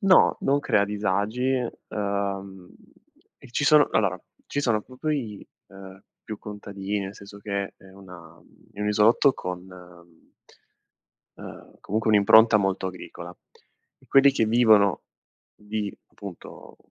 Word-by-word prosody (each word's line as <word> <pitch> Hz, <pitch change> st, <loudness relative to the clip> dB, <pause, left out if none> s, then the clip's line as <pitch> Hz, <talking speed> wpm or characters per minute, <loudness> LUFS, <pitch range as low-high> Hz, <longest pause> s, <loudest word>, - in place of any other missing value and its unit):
no, 195 Hz, -2 st, +5 dB
non 140 Hz, +1 st, +1 dB
crea 100 Hz, -7 st, +2 dB
disagi, 105 Hz, +4 st, -1 dB, 0.4 s
ehm, 100 Hz, -2 st, -4 dB, 0.7 s
e -, -, -16 dB
ci 140 Hz, +4 st, -1 dB
sono 150 Hz, -1 st, +5 dB
allora, 95 Hz, -4 st, +1 dB, 0.3 s
ci 145 Hz, -, -2 dB
sono 115 Hz, -6 st, +1 dB
proprio 130 Hz, +6 st, -5 dB
i, 115 Hz, -9 st, -4 dB, 0.2 s
ehm, 95 Hz, 0 st, -13 dB, 0.2 s
più 110 Hz, -2 st, -7 dB
contadini, 100 Hz, -1 st, -5 dB
nel 95 Hz, 0 st, -6 dB
senso 100 Hz, 0 st, -13 dB
che 100 Hz, -1 st, -4 dB
è -, -, -22 dB
una 90 Hz, -4 st, -14 dB, 0.3 s
è 100 Hz, -, -10 dB
un 105 Hz, -, -1 dB
isolotto 110 Hz, +6 st, +4 dB
con 90 Hz, -6 st, -7 dB, 1.7 s
ehm, -, -, -12 dB
comunque 110 Hz, +2 st, -1 dB
un'impronta 110 Hz, +2 st, +6 dB
molto 95 Hz, -2 st, -1 dB
agricola. 90 Hz, -1 st, -10 dB, 0.7 s
Quelli 135 Hz, +1 st, +6 dB
che 125 Hz, -, +1 dB
vivono 110 Hz, -4 st, +4 dB, 0.5 s
di 105 Hz, -1 st, -5 dB, 0.2 s
appunto 100 Hz, -4 st, -12 dB
105 Hz, 125 wpm, -25 LUFS, 95-110 Hz, 1.7 s, un'impronta